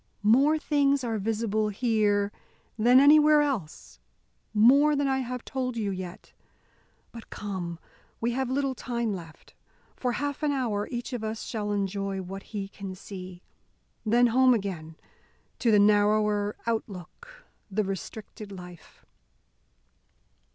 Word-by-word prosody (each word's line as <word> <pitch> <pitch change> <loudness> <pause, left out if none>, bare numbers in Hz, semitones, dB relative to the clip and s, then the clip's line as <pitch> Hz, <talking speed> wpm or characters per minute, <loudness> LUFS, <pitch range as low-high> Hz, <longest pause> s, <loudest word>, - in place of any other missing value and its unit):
More 270 +9 +5
things 280 -3 +1
are 225 -3 -2
visible 215 0 0
here 205 -2 +1 0.4
than 245 +3 +5
anywhere 300 +1 +7
else 245 - -4 0.5
more 275 +8 +5
than 285 0 +1
I 265 0 +1
have 250 -1 -5
told 255 -2 -3
you 205 -3 -1
yet. 185 -1 -8 0.8
But 230 -1 -11
come, 185 -5 -5 0.4
we 235 +1 0
have 260 +1 -1
little 275 0 0
time 235 -3 -2
left. 165 -4 -10 0.4
For 250 -1 -1
half 285 +2 -3
an 300 -1 +1
hour, 230 -7 -1
each 245 +1 -5
of 240 -3 -4
us 220 0 -4
shall 210 -3 -3
enjoy 195 -1 -2
what 190 +1 -6
he 200 -3 -4
can 195 -1 -8
see. 185 -2 -9 0.6
Then 235 +3 +4
home 255 +1 +5
again 175 -7 -5 0.6
to 240 - +2
the 215 - +6
narrower 210 0 +3
outlook, 230 - -5 0.2
the 210 +2 0
restricted 200 +2 -7
life." 180 -3 -12
220 Hz, 130 wpm, -27 LUFS, 200-255 Hz, 0.8 s, anywhere